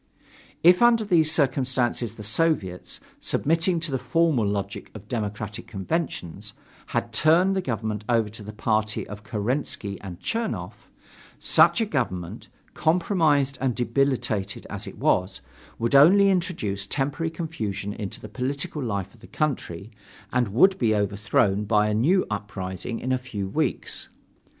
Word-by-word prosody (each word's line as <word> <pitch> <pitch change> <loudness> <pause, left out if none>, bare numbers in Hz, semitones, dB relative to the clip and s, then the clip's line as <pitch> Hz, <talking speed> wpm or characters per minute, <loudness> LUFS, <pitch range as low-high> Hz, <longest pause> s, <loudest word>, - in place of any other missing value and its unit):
If 180 +4 +7
under 235 -2 +5
these 165 -6 +3
circumstances 130 -5 +1
the 105 - -9
Soviets, 110 - 0 0.2
submitting 165 +3 +1
to 155 -3 -3
the 130 - 0
formal 160 -10 +2
logic 100 -1 -3
of 105 -1 -10
democratic 105 -2 -4
conventions, 105 - -4 0.3
had 115 -1 -2
turned 170 - +4
the 190 - +1
government 110 - -3
over 115 -3 +3
to 105 +1 -11
the 105 +1 -7
party 110 0 -1
of 105 0 -9
Kerensky 110 -2 -3
and 95 -3 -8
Chernov, 230 -1 -3 0.6
such - - +4
a - - +2
government, 100 - -3 0.3
compromised 160 -5 +2
and 130 -3 +1
debilitated 120 -4 -1
as - - -5
it - - -9
was, 90 +1 +1 0.4
would 115 +2 -1
only 190 +8 +7
introduce 170 - -1
temporary 145 +4 -1
confusion 110 - -4
into 105 -2 -6
the - - -9
political 135 +6 -3
life 100 -6 -3
of 115 - -21
the 115 - -13
country, 115 - -3 0.4
and 125 -2 +2
would 185 - +4
be 110 -3 +2
overthrown 105 0 +1
by 105 0 +3
a 105 - 0
new 160 - +3
uprising 100 +1 -4
in 130 - -3
a 130 - +1
few 105 -6 -5
weeks. 150 +7 -1
120 Hz, 145 wpm, -25 LUFS, 105-155 Hz, 0.6 s, If